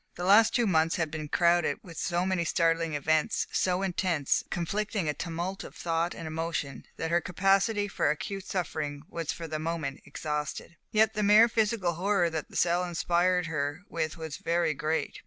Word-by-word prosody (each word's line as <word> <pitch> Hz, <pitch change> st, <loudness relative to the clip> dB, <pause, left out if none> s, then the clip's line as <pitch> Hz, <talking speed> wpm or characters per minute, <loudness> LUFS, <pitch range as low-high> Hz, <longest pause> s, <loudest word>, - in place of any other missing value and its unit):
The 175 Hz, -, -5 dB
last 205 Hz, +4 st, +6 dB
two 240 Hz, -, +3 dB
months 165 Hz, -4 st, +2 dB
had 165 Hz, -3 st, -1 dB
been 155 Hz, -1 st, -5 dB
crowded 170 Hz, +2 st, +2 dB
with 170 Hz, -3 st, -11 dB
so 175 Hz, +2 st, -1 dB
many 185 Hz, -2 st, 0 dB
startling 165 Hz, -1 st, +1 dB
events, 155 Hz, +2 st, +1 dB
so 185 Hz, +1 st, +1 dB
intense, 175 Hz, -6 st, 0 dB
conflicting 200 Hz, +1 st, -2 dB
a 150 Hz, -, +1 dB
tumult 175 Hz, +4 st, -4 dB
of -, -, -11 dB
thought 170 Hz, 0 st, -1 dB
and 165 Hz, -, -7 dB
emotion, 160 Hz, -4 st, -3 dB
that 165 Hz, 0 st, -3 dB
her 175 Hz, 0 st, +3 dB
capacity 195 Hz, +4 st, +2 dB
for 195 Hz, -, 0 dB
acute 195 Hz, +6 st, -3 dB
suffering 150 Hz, -6 st, -3 dB
was 165 Hz, -3 st, -3 dB
for 165 Hz, -, -6 dB
the 155 Hz, -1 st, -3 dB
moment 155 Hz, -4 st, -3 dB
exhausted. 150 Hz, +2 st, -4 dB
Yet 220 Hz, 0 st, +3 dB
the 210 Hz, -, -1 dB
mere 210 Hz, +3 st, +7 dB
physical 215 Hz, -5 st, +1 dB
horror 180 Hz, 0 st, +1 dB
that 160 Hz, -2 st, -4 dB
the -, -, -14 dB
cell 175 Hz, +1 st, +2 dB
inspired 175 Hz, +1 st, +1 dB
her 145 Hz, -1 st, -2 dB
with 160 Hz, -1 st, -3 dB
was 160 Hz, -3 st, -6 dB
very 170 Hz, -1 st, +1 dB
great. 155 Hz, +3 st, -2 dB
170 Hz, 180 wpm, -29 LUFS, 160-190 Hz, -, mere